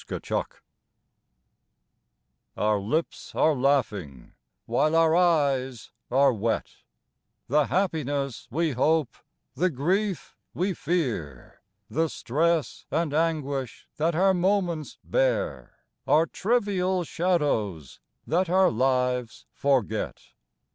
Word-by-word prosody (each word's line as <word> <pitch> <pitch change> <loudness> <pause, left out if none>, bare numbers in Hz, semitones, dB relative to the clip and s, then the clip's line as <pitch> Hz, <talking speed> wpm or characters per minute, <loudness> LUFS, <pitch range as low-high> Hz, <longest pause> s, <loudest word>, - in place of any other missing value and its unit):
109 - - -2 2.1
XVI - - -27
OUR 105 -1 +2
lips 150 +12 -3
are 155 - +4
laughing 110 - -1 0.3
while 155 +1 +1
our 165 0 +4
eyes 140 - +1 0.2
are 135 +1 +4
wet; 115 +1 -2 0.7
The 145 +1 +2
happiness 145 - -1
we 160 +4 0
hope, 140 0 +1 0.4
the 175 +9 +1
grief 185 +7 -1 0.2
we 185 +2 0
fear, 125 - -3 0.3
The 160 +7 0
stress 160 +5 -1
and 165 -3 -1
anguish 145 -5 -2
that 160 +2 +1
our 190 +3 +4
moments 180 -4 0
bear, - - -1 0.3
Are 160 +2 +4
trivial 190 -4 0
shadows 145 - -1 0.3
that 180 +2 +1
our 185 +1 +4
lives 125 -1 0
forget. 125 -6 -1
150 Hz, 100 wpm, -26 LUFS, 125-175 Hz, 2.1 s, are